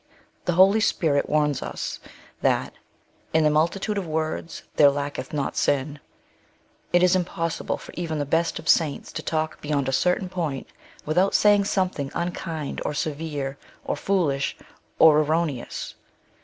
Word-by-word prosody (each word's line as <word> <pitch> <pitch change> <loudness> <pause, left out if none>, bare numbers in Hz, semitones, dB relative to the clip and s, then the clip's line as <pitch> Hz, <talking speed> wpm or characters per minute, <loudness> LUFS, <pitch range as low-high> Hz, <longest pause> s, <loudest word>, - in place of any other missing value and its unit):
The 175 - +1
Holy 190 +5 +6
Spirit 155 -9 +1
warns 150 -2 +1
us - - -5 0.4
that - - +1 0.2
' - - -39
' - - -35
in 160 - +5
the 150 - +4
multitude 185 +7 +1
of 185 - -5
words 160 +1 -3
there 145 - +7
lacketh 140 -1 -4
not 145 -2 -2
sin." 145 +1 0 0.9
It 175 0 +4
is 180 0 +5
impOvSsible 170 -2 -2
for - - -12
even 165 -3 -3
the 145 - -1
best 165 +4 +1
of 160 - -9
saints 155 -4 +2
to - - -5
talk 160 0 -2
beyond 145 -3 -1
a - - 0
certain 180 +7 +1
point 165 -7 -3 0.4
without 180 +6 +2
saying 205 -1 +5
some 190 -2 +1
thing 140 -5 -5
unkind, 165 -3 -3
or 150 - -2
severe, 145 -2 -3 0.3
or - - -1
foolish, 150 -6 0 0.4
or 155 -2 +7
erroneous. 155 -4 -1
160 Hz, 155 wpm, -24 LUFS, 145-175 Hz, 0.9 s, there